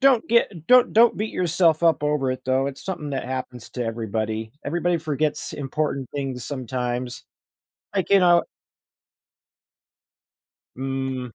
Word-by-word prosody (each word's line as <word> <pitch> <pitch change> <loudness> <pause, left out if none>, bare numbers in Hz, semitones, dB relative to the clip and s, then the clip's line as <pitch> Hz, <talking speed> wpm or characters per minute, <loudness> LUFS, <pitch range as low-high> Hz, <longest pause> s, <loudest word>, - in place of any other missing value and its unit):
don't 270 -4 +4
get 205 -8 +1
don't 250 -1 +6
don't 235 +1 +6
beat 215 +1 -2
yourself 170 -2 +2
up 165 -4 +3
over 150 -3 +1
it, 130 - -6
though. 130 +1 +2
It's 140 -1 -6
something 155 -6 -4
that 135 - -3
happens 130 -1 -5
to 125 - -3
everybody; 110 -1 -3
everybody 170 +3 0
forgets 155 -1 -2
important 140 -2 -2
things 135 -4 -3
sometimes, 125 -2 -4 0.7
like, 195 -1 -1
you 200 - +7
know 175 -1 +5 2.3
Mm. 130 -2 -3
140 Hz, 130 wpm, -24 LUFS, 125-170 Hz, 2.3 s, you